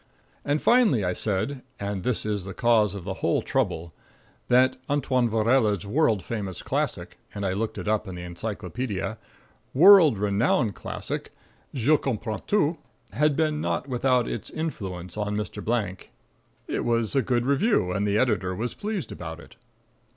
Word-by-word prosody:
And 145 Hz, +1 st, 0 dB
finally 225 Hz, -, +4 dB
I 90 Hz, -, 0 dB
said 110 Hz, +8 st, -1 dB, 0.2 s
(and 100 Hz, -1 st, -3 dB
this 125 Hz, +2 st, 0 dB
is 105 Hz, -3 st, -1 dB
the 95 Hz, 0 st, -8 dB
cause 110 Hz, -5 st, +3 dB
of 100 Hz, -, -6 dB
the 95 Hz, +1 st, -3 dB
whole -, -, +1 dB
trouble) 85 Hz, +1 st, -1 dB, 0.5 s
that 130 Hz, +1 st, +4 dB
Antoine 130 Hz, -4 st, +1 dB
Vaurelle's 110 Hz, -3 st, +2 dB
world 110 Hz, -, +2 dB
famous 100 Hz, -7 st, -4 dB
classic -, -, -3 dB, 0.2 s
and 100 Hz, -1 st, -3 dB
I 95 Hz, -, 0 dB
looked 110 Hz, +3 st, -3 dB
it -, -, -5 dB
up 110 Hz, 0 st, 0 dB
in 95 Hz, -, -6 dB
the 90 Hz, -, -7 dB
encyclopedia 100 Hz, +4 st, -4 dB, 0.6 s
world 170 Hz, -, +8 dB
renowned 105 Hz, +2 st, +1 dB
classic, -, -, -5 dB, 0.4 s
"Je 140 Hz, +4 st, +3 dB
Comprends 110 Hz, -6 st, -3 dB
Tout," 170 Hz, -5 st, +2 dB, 0.3 s
had 150 Hz, 0 st, +2 dB
been 155 Hz, -1 st, 0 dB
not 85 Hz, +9 st, -2 dB
without 125 Hz, -1 st, +1 dB
its 110 Hz, -, -4 dB
influence 95 Hz, -, -5 dB
on 105 Hz, 0 st, -1 dB
Mr. 105 Hz, -3 st, -5 dB
Blank. 105 Hz, -5 st, -2 dB, 0.6 s
It -, -, -2 dB
was 115 Hz, -2 st, 0 dB
a 135 Hz, -, +4 dB
good 120 Hz, -2 st, 0 dB
review, 140 Hz, -, +2 dB
and 100 Hz, +3 st, 0 dB
the 100 Hz, +1 st, +2 dB
editor 100 Hz, -7 st, +1 dB
was 120 Hz, +5 st, -3 dB
pleased 210 Hz, -4 st, -4 dB
about 85 Hz, -1 st, -7 dB
it. -, -, -15 dB
110 Hz, 160 wpm, -26 LUFS, 100-130 Hz, 0.6 s, world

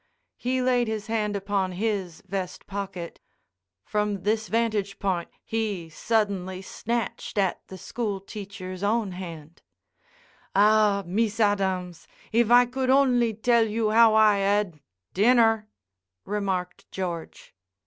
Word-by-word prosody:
He 255 Hz, +1 st, 0 dB
laid 250 Hz, -2 st, +2 dB
his 220 Hz, -1 st, -3 dB
hand 215 Hz, -2 st, -1 dB
upon 195 Hz, -2 st, -1 dB
his 195 Hz, -3 st, -2 dB
vest 190 Hz, -1 st, -4 dB
pocket. 195 Hz, -4 st, -6 dB, 0.7 s
From 210 Hz, -2 st, -1 dB
this 215 Hz, +2 st, 0 dB
vantage 215 Hz, -4 st, 0 dB
point 185 Hz, -4 st, -1 dB
he 210 Hz, -7 st, -3 dB
suddenly 195 Hz, -2 st, -1 dB
snatched 230 Hz, +1 st, -4 dB
at 195 Hz, -3 st, +1 dB
the 190 Hz, -, -9 dB
school 205 Hz, +1 st, -3 dB
teacher's 195 Hz, -2 st, -8 dB
own 210 Hz, 0 st, +1 dB
hand, 170 Hz, -3 st, -9 dB, 0.9 s
"Ah! 210 Hz, 0 st, +4 dB
Mees 210 Hz, +5 st, -1 dB
Adams, 190 Hz, -4 st, 0 dB, 0.2 s
if 230 Hz, 0 st, +3 dB
I 245 Hz, +1 st, +7 dB
could 255 Hz, +1 st, -2 dB
only 255 Hz, -4 st, +4 dB
tell 230 Hz, +1 st, +3 dB
you 215 Hz, 0 st, 0 dB
how 225 Hz, 0 st, +6 dB
I 215 Hz, -2 st, +5 dB
ad—" 195 Hz, -4 st, +1 dB, 0.3 s
"Dinner," 225 Hz, 0 st, +4 dB, 0.6 s
remarked 190 Hz, -3 st, -3 dB
George. 175 Hz, -4 st, -6 dB
205 Hz, 120 wpm, -26 LUFS, 190-225 Hz, 0.9 s, I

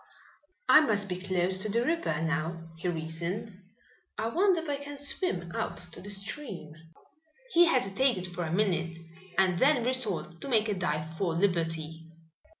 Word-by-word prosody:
"I -, -, +9 dB
must 205 Hz, -8 st, +1 dB
be 180 Hz, 0 st, -2 dB
close 185 Hz, 0 st, 0 dB
to 210 Hz, -, 0 dB
the 235 Hz, +4 st, +1 dB
river 320 Hz, -, 0 dB
now," 165 Hz, +1 st, -2 dB
he 165 Hz, +2 st, -4 dB
reasoned. 170 Hz, +5 st, -3 dB, 0.7 s
"I 220 Hz, +1 st, -1 dB
wonder 365 Hz, -, +3 dB
if 330 Hz, -, -8 dB
I 285 Hz, -1 st, 0 dB
can 285 Hz, 0 st, -8 dB
swim 275 Hz, -, -1 dB
out -, -, -2 dB
to -, -, -11 dB
the 200 Hz, -, -7 dB
stream?" 195 Hz, -, -4 dB, 0.8 s
He 345 Hz, 0 st, +7 dB
hesitated 245 Hz, -, +2 dB
for 175 Hz, 0 st, -4 dB
a 160 Hz, -, -3 dB
minute 170 Hz, -4 st, +1 dB, 0.4 s
and 185 Hz, -2 st, +3 dB
then 270 Hz, -3 st, +4 dB
resolved 210 Hz, -9 st, -2 dB
to -, -, -5 dB
make 220 Hz, -3 st, +3 dB
a -, -, +2 dB
dive 160 Hz, -4 st, -2 dB
for 175 Hz, -4 st, +1 dB
liberty. 165 Hz, -3 st, -1 dB
190 Hz, 160 wpm, -30 LUFS, 165-245 Hz, 0.8 s, I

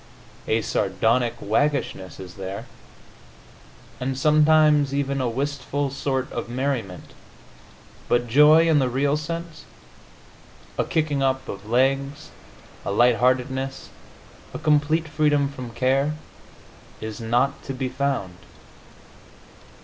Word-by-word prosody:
A 110 Hz, 0 st, +1 dB
sardonic 110 Hz, +5 st, +1 dB
waggishness 110 Hz, -, -1 dB
is 90 Hz, -2 st, -9 dB
there, 95 Hz, +1 st, -6 dB, 1.3 s
and 130 Hz, +1 st, -2 dB
sometimes 150 Hz, -1 st, +4 dB
even 140 Hz, -1 st, -1 dB
a 125 Hz, -, 0 dB
wistful 140 Hz, +2 st, -2 dB
sort 130 Hz, -1 st, -2 dB
of -, -, -5 dB
merriment, 125 Hz, -7 st, -3 dB, 0.9 s
but 120 Hz, 0 st, +2 dB
joy 150 Hz, +6 st, +6 dB
in 160 Hz, -2 st, +4 dB
the 130 Hz, -2 st, +1 dB
real 140 Hz, +3 st, +1 dB
sense 165 Hz, +1 st, -6 dB, 1.1 s
a -, -, 0 dB
kicking 150 Hz, -3 st, 0 dB
up 130 Hz, 0 st, 0 dB
of 105 Hz, -, -8 dB
legs, 135 Hz, +5 st, 0 dB, 0.5 s
a -, -, -4 dB
light 120 Hz, +3 st, +4 dB
heartedness, 130 Hz, +2 st, 0 dB, 0.7 s
a -, -, -1 dB
complete 155 Hz, +1 st, +2 dB
freedom 150 Hz, -2 st, +2 dB
from 130 Hz, -4 st, -7 dB
care 135 Hz, +5 st, +1 dB, 0.8 s
is 110 Hz, +1 st, -6 dB
not 120 Hz, +5 st, 0 dB
to -, -, -4 dB
be 130 Hz, 0 st, -2 dB
found. 130 Hz, -9 st, -2 dB
135 Hz, 110 wpm, -23 LUFS, 120-145 Hz, 1.3 s, joy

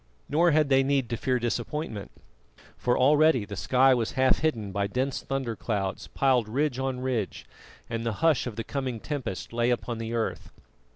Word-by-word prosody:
Nor 170 Hz, +4 st, +3 dB
had 155 Hz, -2 st, +3 dB
they 135 Hz, -1 st, +5 dB
need 135 Hz, -3 st, +1 dB
to -, -, +1 dB
fear 130 Hz, +2 st, 0 dB
disappointment, 120 Hz, -1 st, -3 dB, 0.7 s
for 125 Hz, 0 st, 0 dB
already 145 Hz, -3 st, +4 dB
the 100 Hz, 0 st, -7 dB
sky 130 Hz, +8 st, +4 dB
was 120 Hz, -3 st, -1 dB
half 130 Hz, 0 st, +3 dB
hidden 115 Hz, -11 st, -1 dB
by 100 Hz, +1 st, -1 dB
dense 130 Hz, +6 st, -2 dB
thunder 135 Hz, -4 st, -3 dB
clouds 100 Hz, -4 st, -3 dB
piled 125 Hz, -5 st, +1 dB
ridge 135 Hz, +2 st, 0 dB
on 130 Hz, -1 st, -2 dB
ridge, 125 Hz, -6 st, -2 dB, 0.4 s
and 115 Hz, -1 st, -3 dB
the 115 Hz, -1 st, -1 dB
hush 155 Hz, -6 st, +3 dB
of 115 Hz, -, -5 dB
the 115 Hz, -, -3 dB
coming 130 Hz, -2 st, -3 dB
tempest 130 Hz, -8 st, -5 dB
lay 120 Hz, +1 st, +1 dB
upon 120 Hz, -1 st, -1 dB
the 115 Hz, +1 st, -3 dB
earth. 115 Hz, -, -2 dB
125 Hz, 180 wpm, -27 LUFS, 115-135 Hz, 0.7 s, they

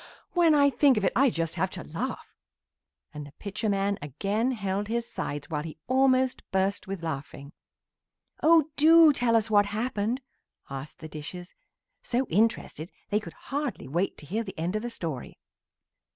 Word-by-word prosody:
when 335 Hz, -3 st, +4 dB
I 280 Hz, -1 st, +5 dB
think 275 Hz, -3 st, +4 dB
of 205 Hz, -, +1 dB
it -, -, +2 dB
I 275 Hz, +2 st, +5 dB
just 165 Hz, -5 st, -2 dB
have 190 Hz, -, +2 dB
to 170 Hz, -, -6 dB
laugh," 235 Hz, +12 st, -5 dB, 0.8 s
and 150 Hz, -1 st, -8 dB
Pitcher 210 Hz, +2 st, -3 dB
man 200 Hz, 0 st, 0 dB
again 200 Hz, -, -1 dB
held 200 Hz, -2 st, -2 dB
his 235 Hz, +1 st, -1 dB
sides 145 Hz, -10 st, -4 dB
while 150 Hz, -2 st, -1 dB
he 155 Hz, 0 st, -8 dB
almost 260 Hz, 0 st, +3 dB
burst 190 Hz, +1 st, 0 dB
with 190 Hz, -3 st, -5 dB
laughing. 140 Hz, -2 st, -6 dB, 0.9 s
"Oh, 315 Hz, -1 st, +5 dB
do 320 Hz, 0 st, +7 dB
tell 245 Hz, -3 st, +2 dB
us 225 Hz, -1 st, +2 dB
what 205 Hz, -1 st, +5 dB
happened!" 220 Hz, +2 st, -1 dB, 0.5 s
asked 135 Hz, +3 st, -7 dB
the 160 Hz, -, -6 dB
dishes, 160 Hz, +4 st, -8 dB, 0.5 s
so 250 Hz, +2 st, 0 dB
interested 190 Hz, -4 st, 0 dB, 0.2 s
they 210 Hz, -, +3 dB
could 170 Hz, -6 st, -10 dB, 0.2 s
hardly 285 Hz, -, -2 dB
wait 170 Hz, +8 st, -1 dB
to -, -, -11 dB
hear 215 Hz, +10 st, -2 dB
the 195 Hz, -4 st, -9 dB
end 170 Hz, +5 st, -2 dB
of 215 Hz, -, 0 dB
the 240 Hz, -, -4 dB
story. 160 Hz, -, -6 dB
205 Hz, 165 wpm, -27 LUFS, 165-250 Hz, 0.9 s, do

